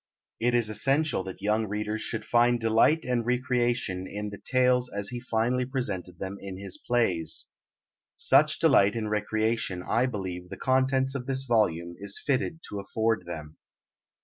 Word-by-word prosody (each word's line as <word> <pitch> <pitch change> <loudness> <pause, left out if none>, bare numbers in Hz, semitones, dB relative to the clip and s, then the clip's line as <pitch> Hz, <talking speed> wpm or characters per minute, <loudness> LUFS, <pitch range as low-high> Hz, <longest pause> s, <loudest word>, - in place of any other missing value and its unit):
It 120 +1 +2
is 120 -2 +3
essential 135 +1 +1
that 95 0 -8
young 105 +1 +1
readers 105 +1 -3
should 110 - -3
find 120 0 +3
delight 115 +8 +3
and 125 -2 0
recreation 120 -6 0
in 105 +1 -5
the 100 - -9
tales 125 -1 +3
as 100 -2 -2
he 125 - -5
finally 120 +1 0
presented 105 -9 -3
them 95 +2 -5
in 95 -1 -7
his 95 -1 -4
plays. 115 -10 0 0.7
Such - - +4
delight 100 +2 +4
and 110 -2 -3
recreation 110 -3 -1
I 120 +3 +2
believe 95 -6 -5
the - - -7
contents 130 0 +1
of 130 -2 -5
this 135 -1 +1
volume 85 -9 +1
is 100 0 0
fitted 145 +4 -1
to 100 - -5
afford 110 -1 -1
them. 80 -2 -7
110 Hz, 160 wpm, -27 LUFS, 100-125 Hz, 0.7 s, Such